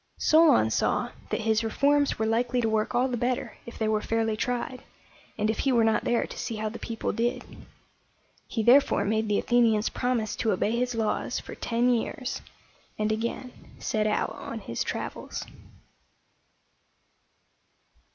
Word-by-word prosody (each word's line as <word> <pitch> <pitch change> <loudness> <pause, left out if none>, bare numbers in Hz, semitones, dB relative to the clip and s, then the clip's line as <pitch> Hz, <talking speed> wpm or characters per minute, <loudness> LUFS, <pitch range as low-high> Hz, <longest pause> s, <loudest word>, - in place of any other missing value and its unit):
Solon 310 - +5
saw - - 0 0.2
that - - -1
his 220 +1 +1
reforms 285 +5 +2
were 220 - 0
likely 240 +3 +1
to 230 - +1
work 220 +2 0
all 250 +2 +3
the 250 -2 -2
better 245 +1 -2
if 235 - -9
they 220 - 0
were 215 -1 +1
fairly 225 -1 0
tried, 245 +2 -3 0.6
and 210 - +1
if 220 - -1
he 270 - +2
were 235 -2 +4
not 220 -1 +2
there 240 - +2
to - - -10
see 230 - -3
how 215 0 -2
the 230 - -8
people 225 -1 -3
did. 240 +2 -1 1.0
He 225 - -2
therefore 245 -3 +5
made 220 +1 0
the 205 -1 +2
Athenians 230 -3 +3
promise 240 -4 -1
to 220 - +1
obey 210 +4 0
his 245 0 -1
laws 220 -2 -1
for - - -9
ten 235 +1 0
years, 250 +1 -1 0.6
and 215 0 0
again 235 +3 -3 0.2
set 215 -1 0
out 210 - 0
on 230 - -7
his 115 -10 -3
travels. - - -5
230 Hz, 160 wpm, -27 LUFS, 220-245 Hz, 1.0 s, Solon